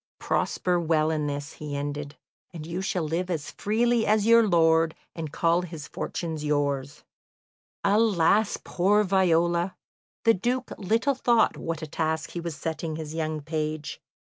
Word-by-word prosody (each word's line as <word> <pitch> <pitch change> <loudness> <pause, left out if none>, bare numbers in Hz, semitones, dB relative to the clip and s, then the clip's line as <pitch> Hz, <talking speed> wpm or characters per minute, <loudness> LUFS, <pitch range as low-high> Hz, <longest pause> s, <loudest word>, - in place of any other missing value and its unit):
"Prosper 180 -1 0
well 160 -1 +2
in 150 -2 -1
this," 145 +1 -4
he 150 -2 -6
ended, 145 0 -4 0.4
"and 160 -3 -8
you 170 +3 -4
shall 185 -2 -1
live 170 +4 -2
as 160 -5 -3
freely 230 +2 +1
as 210 -1 +3
your 230 -1 +6
lord, 165 -2 +3 0.2
and 160 -3 -5
call 170 +2 +2
his 165 -5 -7
fortunes 160 -3 -4
yours." 145 -2 -1 0.8
Alas, 205 -1 +3
poor 205 +4 +2
Viola! 175 -2 +2 0.5
The 230 - +6
Duke 245 +6 -2
little 225 +8 +1
thought 240 -3 +3
what 165 -1 -4
a - - -2
task 160 +1 -2
he 175 - -4
was 170 -2 -4
setting 160 +1 -4
his 155 -1 -6
young 155 -1 -2
page. 155 0 -4
165 Hz, 150 wpm, -26 LUFS, 155-195 Hz, 0.8 s, your